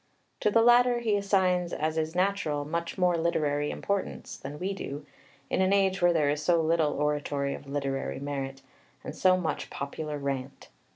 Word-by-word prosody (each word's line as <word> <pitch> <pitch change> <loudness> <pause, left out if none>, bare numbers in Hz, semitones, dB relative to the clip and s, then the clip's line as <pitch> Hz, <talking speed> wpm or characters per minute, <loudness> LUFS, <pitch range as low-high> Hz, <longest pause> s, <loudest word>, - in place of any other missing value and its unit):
To - - +2
the 225 +2 +4
latter 240 +1 +5
he 225 -3 +1
assigns, 185 -3 +1
as 155 +1 -1
is 160 +1 -2
natural, 180 -6 0
much 170 +4 -3
more 180 -2 +3
literary 150 -3 0
importance 200 -1 -3
than 140 +2 -8
we 190 +5 -2
do, 145 -6 -6 0.4
in - - 0
an 190 0 +3
age 195 -1 +2
when 175 0 +5
there 150 -3 +3
is 145 +1 -2
so 170 +2 +3
little 160 -2 +2
oratory 145 -1 -1
of 140 - -9
literary 140 -2 -2
merit, 135 -1 -5 0.4
and - - -6
so 185 -1 +4
much 170 -3 -3
popular 150 +2 -5
rant. 135 -1 -4
160 Hz, 175 wpm, -28 LUFS, 145-185 Hz, 0.4 s, latter